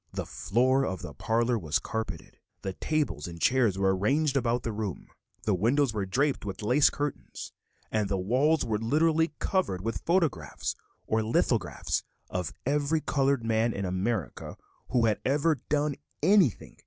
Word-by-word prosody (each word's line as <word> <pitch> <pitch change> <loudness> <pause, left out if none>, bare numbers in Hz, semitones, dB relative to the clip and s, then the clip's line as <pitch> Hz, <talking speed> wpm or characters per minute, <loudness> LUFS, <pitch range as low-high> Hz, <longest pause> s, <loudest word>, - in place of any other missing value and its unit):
The - - -4
floor 130 +8 +1
of 95 -6 -3
the - - -7
parlor 115 +1 +1
was 80 -3 0
carpeted; 110 -7 -5 0.2
small 95 - -3
tables 145 - -1
and 85 -1 -8
chairs 120 -3 +3
were 95 -1 +2
arranged 140 +9 +1
about 120 -2 +1
the 115 - -2
room; 105 -3 -5 0.3
the 105 - +1
windows 120 +7 +2
were 100 -3 -2
draped 135 +8 +1
with 100 0 -5
lace 130 +7 +5
curtains, 145 -1 -5 0.4
and 105 -2 0
the 100 - 0
walls 130 +12 +2
were 110 -2 -1
literally 155 +7 +2
covered 180 - 0
with 115 +3 -3
photographs 165 - 0 0.3
or 110 0 +1
lithographs 110 +1 0 0.3
of 90 -2 -2
every 145 +3 +1
colored 135 -4 +1
man 115 +1 +2
in 100 - -3
America 95 - -2 0.3
who 120 -3 +3
had 110 -2 +1
ever 150 +3 +2
"done 150 0 +1 0.3
anything." 185 - +3
115 Hz, 155 wpm, -28 LUFS, 100-145 Hz, 0.4 s, lace